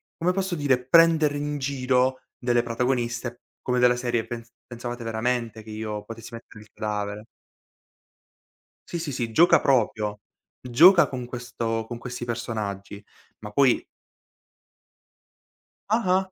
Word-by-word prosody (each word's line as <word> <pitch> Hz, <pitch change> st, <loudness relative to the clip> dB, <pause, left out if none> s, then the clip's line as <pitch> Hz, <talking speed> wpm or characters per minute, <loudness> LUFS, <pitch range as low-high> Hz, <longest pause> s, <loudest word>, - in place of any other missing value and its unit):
come 180 Hz, +2 st, 0 dB
posso 190 Hz, -1 st, -2 dB
dire, 135 Hz, -5 st, +1 dB
prendere 160 Hz, -2 st, +5 dB
in 145 Hz, 0 st, -2 dB
giro 130 Hz, -1 st, +1 dB, 0.2 s
delle 120 Hz, -1 st, +2 dB
protagoniste, 120 Hz, 0 st, -2 dB, 0.2 s
come 125 Hz, 0 st, -1 dB
della 125 Hz, 0 st, +5 dB
serie: 120 Hz, -2 st, -1 dB
"Pens 115 Hz, -1 st, -7 dB, 0.2 s
pensavate 120 Hz, 0 st, -6 dB
veramente 115 Hz, 0 st, -2 dB
che 110 Hz, -, -11 dB
io 105 Hz, -1 st, -5 dB
potessi 115 Hz, +1 st, -9 dB
mettere 110 Hz, -2 st, -12 dB
il 105 Hz, -, -22 dB
cadavere?" 105 Hz, 0 st, -4 dB, 1.6 s
Sì, 170 Hz, -, -4 dB
sì, 155 Hz, -4 st, -4 dB
sì, 120 Hz, -3 st, -3 dB
gioca 170 Hz, +4 st, +5 dB
proprio, 110 Hz, -5 st, +1 dB, 0.4 s
gioca 170 Hz, +9 st, +6 dB
con 125 Hz, -2 st, -5 dB
questo 120 Hz, -2 st, -3 dB
con 120 Hz, -, -6 dB
questi 125 Hz, 0 st, -6 dB
personaggi, 105 Hz, -4 st, -4 dB, 0.4 s
ma 105 Hz, -1 st, -8 dB
poi 135 Hz, 0 st, +3 dB, 2.1 s
Ah-ah! 190 Hz, -4 st, +2 dB
120 Hz, 125 wpm, -25 LUFS, 115-135 Hz, 2.1 s, gioca